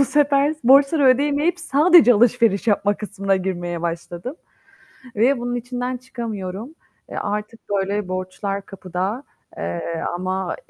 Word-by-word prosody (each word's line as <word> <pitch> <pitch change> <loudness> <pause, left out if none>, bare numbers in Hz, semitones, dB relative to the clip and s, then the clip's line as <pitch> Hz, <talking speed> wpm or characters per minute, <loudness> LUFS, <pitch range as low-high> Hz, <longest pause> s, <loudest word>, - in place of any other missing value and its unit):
bu - - +6
sefer 285 +1 +2
s 310 - -12
borçları 275 +3 +5
ödeyemeyip 290 +6 +2
sadece 320 -4 +6
alışveriş 230 -2 +3
yapma 205 -1 +2
kısmına 195 -2 -1
girmeye 175 -2 -3
başladım 170 - -5 0.8
ve 245 +5 +3
bunun 245 0 -3
içinden 245 +1 -3
çıkamıyorum. 230 - -6 0.3
Eee, - - -8
artık 210 +2 -4
böyle 200 0 -1
borçlar 185 +2 -4
kapıda, 190 +5 -4 0.3
eee, 85 - -4
ama 185 +1 -2
215 Hz, 125 wpm, -21 LUFS, 190-265 Hz, 0.8 s, bu